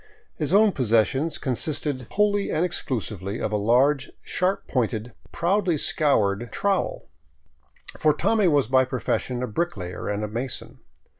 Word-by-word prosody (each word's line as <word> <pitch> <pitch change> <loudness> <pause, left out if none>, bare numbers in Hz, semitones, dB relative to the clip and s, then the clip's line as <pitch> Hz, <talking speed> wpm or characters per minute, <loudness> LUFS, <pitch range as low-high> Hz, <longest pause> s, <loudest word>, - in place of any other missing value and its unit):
His 150 -1 -2
own 210 +2 +5
possessions 130 - +1
consisted 135 -1 -3
wholly 205 0 +1
and 165 - +1
exclusively 110 - -3
of - - -2
a - - 0
large, 130 +7 +2
sharp 185 +2 -1
pointed, 115 -2 -1 0.2
proudly 175 -1 +1
scoured 120 - +1
trowel; 200 -2 -1 0.9
for 155 - +4
Tommy 215 +5 +2
was 145 -7 +3
by 130 +1 +4
profession 125 -1 -2
a - - -1
bricklayer 105 - -3
and 105 +1 -2
mason. 125 +1 -5
135 Hz, 130 wpm, -24 LUFS, 115-170 Hz, 0.9 s, own